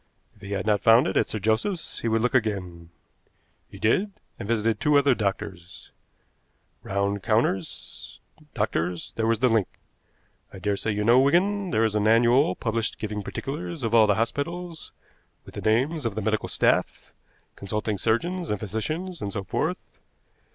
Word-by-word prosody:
If 105 Hz, -, -24 dB
he 100 Hz, 0 st, -6 dB
had 95 Hz, -2 st, -2 dB
not 105 Hz, -2 st, +2 dB
found 115 Hz, +3 st, +6 dB
it 95 Hz, -, -2 dB
at -, -, +2 dB
Sir -, -, -3 dB
Joseph's 110 Hz, -, -1 dB
he -, -, -3 dB
would 110 Hz, 0 st, +1 dB
look 125 Hz, -, +1 dB
again. 95 Hz, -8 st, -1 dB, 0.8 s
He -, -, -12 dB
did, 190 Hz, -, +1 dB, 0.3 s
and 100 Hz, -, -6 dB
visited 110 Hz, -1 st, 0 dB
two 150 Hz, -1 st, +3 dB
other 140 Hz, -1 st, +4 dB
doctors. 95 Hz, -5 st, -5 dB, 0.9 s
Round 100 Hz, +1 st, -1 dB
counters 110 Hz, -5 st, -2 dB, 0.4 s
doctors. 90 Hz, -5 st, -2 dB
There 110 Hz, 0 st, 0 dB
was 115 Hz, 0 st, +1 dB
the 130 Hz, -, +5 dB
link. 110 Hz, -5 st, +2 dB, 0.8 s
I -, -, -10 dB
daresay 105 Hz, +2 st, -1 dB
you 105 Hz, 0 st, -1 dB
know, 120 Hz, +4 st, +6 dB
Wigan, 185 Hz, +8 st, +2 dB
there 115 Hz, -5 st, +2 dB
is 110 Hz, -2 st, +1 dB
an 105 Hz, 0 st, +1 dB
annual 120 Hz, +6 st, +4 dB
published 115 Hz, -1 st, -2 dB
giving 105 Hz, -1 st, -4 dB
particulars 145 Hz, -, -5 dB
of 115 Hz, 0 st, -1 dB
all 110 Hz, -2 st, +6 dB
the 100 Hz, -, +3 dB
hospitals, 165 Hz, -, -3 dB, 0.5 s
with -, -, -13 dB
the -, -, -6 dB
names 135 Hz, +9 st, +1 dB
of 105 Hz, -, -5 dB
the 110 Hz, -, -2 dB
medical 110 Hz, +1 st, -1 dB
staff, -, -, 0 dB, 0.4 s
consulting 105 Hz, +1 st, -3 dB
surgeons 170 Hz, -, -1 dB
and 105 Hz, -, -1 dB
physicians, 155 Hz, -, -4 dB
and 100 Hz, -, -3 dB
so 100 Hz, 0 st, -4 dB
forth. -, -, -3 dB
110 Hz, 165 wpm, -25 LUFS, 105-135 Hz, 0.9 s, found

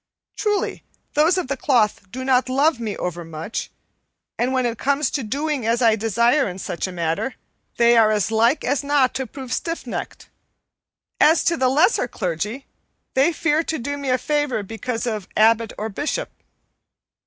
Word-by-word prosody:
Truly, 415 Hz, -2 st, -1 dB, 0.3 s
those 315 Hz, +5 st, +3 dB
of 365 Hz, -, -1 dB
the 275 Hz, -, -1 dB
cloth 220 Hz, -7 st, +1 dB
do 260 Hz, +3 st, -5 dB
not 260 Hz, -1 st, +2 dB
love 275 Hz, +1 st, +2 dB
me 220 Hz, -3 st, -4 dB
overmuch, 170 Hz, +2 st, -5 dB, 0.7 s
and 245 Hz, +2 st, +1 dB
when 260 Hz, -1 st, +1 dB
it 235 Hz, -1 st, -2 dB
comes 280 Hz, +2 st, +1 dB
to 280 Hz, -, -1 dB
doing 280 Hz, +4 st, -2 dB
as 230 Hz, +1 st, +1 dB
I 225 Hz, -2 st, +5 dB
desire 235 Hz, +5 st, +2 dB
in 180 Hz, -, -7 dB
such 185 Hz, -1 st, -4 dB
a -, -, -6 dB
matter, 170 Hz, +8 st, -2 dB, 0.4 s
they 235 Hz, 0 st, +5 dB
are 225 Hz, -2 st, +6 dB
as 210 Hz, -1 st, 0 dB
like 235 Hz, +7 st, +3 dB
as 280 Hz, +2 st, 0 dB
not 280 Hz, -3 st, +2 dB
to 265 Hz, -1 st, -3 dB
prove 260 Hz, -1 st, -7 dB
stiff 330 Hz, +6 st, -3 dB
necked. -, -, -6 dB, 0.9 s
As 315 Hz, +2 st, +5 dB
to 340 Hz, -, +2 dB
the 260 Hz, -5 st, +2 dB
lesser 315 Hz, -, +3 dB
clergy, 210 Hz, -, -3 dB, 0.5 s
they 270 Hz, +6 st, +3 dB
fear 315 Hz, -1 st, +1 dB
to 320 Hz, -, -2 dB
do 285 Hz, +4 st, -3 dB
me 280 Hz, -2 st, -4 dB
a 255 Hz, -, +3 dB
favor 290 Hz, -6 st, -1 dB
because 225 Hz, +3 st, -4 dB
of 215 Hz, -5 st, -3 dB
abbot 225 Hz, +1 st, +4 dB
or 215 Hz, -, -3 dB
bishop. 295 Hz, -, -3 dB
250 Hz, 175 wpm, -22 LUFS, 220-285 Hz, 0.9 s, are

